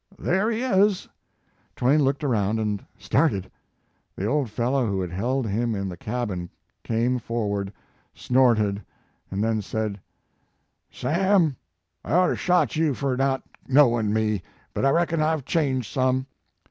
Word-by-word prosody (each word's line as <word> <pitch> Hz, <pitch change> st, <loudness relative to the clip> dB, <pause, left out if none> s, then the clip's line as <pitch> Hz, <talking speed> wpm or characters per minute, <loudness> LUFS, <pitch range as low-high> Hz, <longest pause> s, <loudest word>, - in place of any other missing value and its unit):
"There 190 Hz, +5 st, +1 dB
he 230 Hz, +2 st, -1 dB
is." 205 Hz, -5 st, +2 dB, 0.7 s
Twain 140 Hz, +4 st, +3 dB
looked 135 Hz, +2 st, 0 dB
around 110 Hz, -5 st, +1 dB
and 105 Hz, -2 st, -2 dB
started. 95 Hz, -2 st, 0 dB, 0.6 s
The 95 Hz, -, -3 dB
old 140 Hz, +1 st, 0 dB
fellow 120 Hz, +3 st, 0 dB
who 100 Hz, -2 st, -1 dB
had 90 Hz, -2 st, -3 dB
held 120 Hz, +8 st, -1 dB
him 115 Hz, +2 st, -1 dB
in 100 Hz, -1 st, -3 dB
the 90 Hz, -, -6 dB
cabin 105 Hz, -4 st, -4 dB, 0.3 s
came 120 Hz, +2 st, 0 dB
forward, 100 Hz, -4 st, -2 dB, 0.4 s
snorted, 110 Hz, -6 st, +2 dB, 0.5 s
and 100 Hz, +2 st, -2 dB
then 110 Hz, -1 st, +1 dB
said: 105 Hz, 0 st, -3 dB, 0.9 s
"Sam, 175 Hz, -3 st, +2 dB, 0.5 s
I -, -, -3 dB
oughter 180 Hz, +1 st, +4 dB
shot 180 Hz, -1 st, +2 dB
you 155 Hz, -3 st, +1 dB
fur 135 Hz, -1 st, -1 dB
not 135 Hz, 0 st, 0 dB, 0.2 s
knowin 120 Hz, -6 st, +4 dB
me, 110 Hz, -2 st, 0 dB, 0.3 s
but -, -, 0 dB
I -, -, +5 dB
reckon 165 Hz, +1 st, +1 dB
I 155 Hz, +1 st, +2 dB
ve 150 Hz, -, -6 dB
changed 130 Hz, -, -1 dB
some. 130 Hz, 0 st, +1 dB
125 Hz, 145 wpm, -25 LUFS, 105-145 Hz, 0.9 s, I